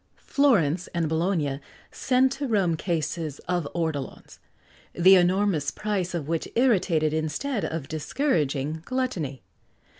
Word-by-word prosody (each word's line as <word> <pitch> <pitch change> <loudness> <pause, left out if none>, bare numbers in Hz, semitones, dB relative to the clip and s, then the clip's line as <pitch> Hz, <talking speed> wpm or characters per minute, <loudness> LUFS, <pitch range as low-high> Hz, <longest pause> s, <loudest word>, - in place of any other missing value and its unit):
Florence 185 - +2
and 170 -2 +1
Bologna 160 -4 0 0.3
sent 260 0 +2
to 275 +1 -3
Rome 195 -8 +2
cases 160 -3 -3
of 175 -4 -1
ortolans, 160 -5 -4 0.5
the 185 +2 +6
enormous 180 -4 +3
price 190 -3 -2
of 155 -4 -4
which 165 0 -2
irritated 185 - +2
instead 160 - -2
of 160 -4 -3
discouraging 155 - -1
gluttony. 180 - -3
170 Hz, 115 wpm, -26 LUFS, 155-205 Hz, 0.5 s, the